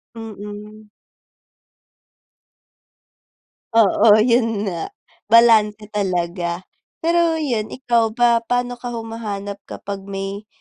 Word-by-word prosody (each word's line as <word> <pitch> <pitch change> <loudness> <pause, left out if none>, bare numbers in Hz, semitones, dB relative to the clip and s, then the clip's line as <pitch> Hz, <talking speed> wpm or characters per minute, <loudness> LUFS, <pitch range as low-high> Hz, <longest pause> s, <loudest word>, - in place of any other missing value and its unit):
Mm. 210 -1 -9 2.9
Oo, 215 -1 +6
'yon 230 -3 +1
nga, 175 -5 -3 0.4
balanse 215 -2 +4
talaga. 175 -3 -2 0.4
Pero 335 0 +2
'yon, 245 -9 -1
ikaw 230 -2 0
ba, 235 -1 +4
paano 245 +1 -2
ka 245 - -6
humahanap 210 -3 -6
kapag 195 -1 -7
may, 195 +1 -5
215 Hz, 85 wpm, -20 LUFS, 200-235 Hz, 2.9 s, Oo